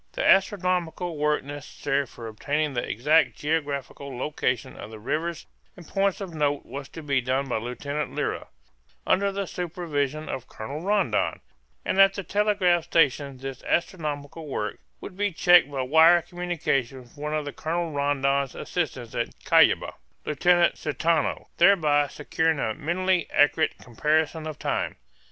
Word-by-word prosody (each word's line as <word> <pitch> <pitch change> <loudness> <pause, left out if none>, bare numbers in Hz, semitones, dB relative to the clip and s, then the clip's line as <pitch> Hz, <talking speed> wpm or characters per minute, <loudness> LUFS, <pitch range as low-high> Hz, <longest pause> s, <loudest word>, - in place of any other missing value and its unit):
The - - 0
astronomical 180 -3 +2
work 150 -1 +1
necessary 140 0 -3
for 115 0 -11
obtaining 145 +7 -1
the 120 - -1
exact 150 +9 +2
geographical 140 -3 -3
location 130 -2 -2
of - - -9
the 110 - -9
rivers 155 +9 -3 0.3
and 175 -3 -12
points 195 -1 0
of 190 -4 -6
note 145 -2 0
was 140 0 -7
to 165 - -9
be 140 -3 +1
done 130 +2 -1
by 125 - -1
Lieutenant 140 +6 -4
Lyra, - - -2 0.6
under 200 +1 +2
the 200 0 -3
supervision 155 -5 -3
of 130 -1 -5
Colonel 140 +8 -7
Rondon; 200 +1 +1 0.5
and 195 - +3
at 195 0 +6
the 195 - -4
telegraph 190 -3 +2
stations 140 -5 +1
this 135 -1 -6
astronomical 155 -3 -2
work 105 -6 -3 0.2
would 185 - -8
be 205 +1 0
checked 175 -2 +5
by 135 -2 -2
wire 160 +5 +6
communications 140 -8 -2
with - - -23
one 150 +1 -2
of 145 -2 -3
Colonel 165 +1 -2
Rondon's 140 -2 0
assistants 130 -9 -3
at 120 - -1 0.2
Cuyaba, - - +4 0.3
Lieutenant 175 +4 +3
Caetano, 155 +1 0
thereby 155 -6 +4
securing 160 +3 -1
a 110 -5 -1
minutely 180 - 0
accurate 145 +2 +3
comparison 155 +5 0
of 155 - -6
time. - - -2
150 Hz, 145 wpm, -26 LUFS, 140-175 Hz, 0.6 s, at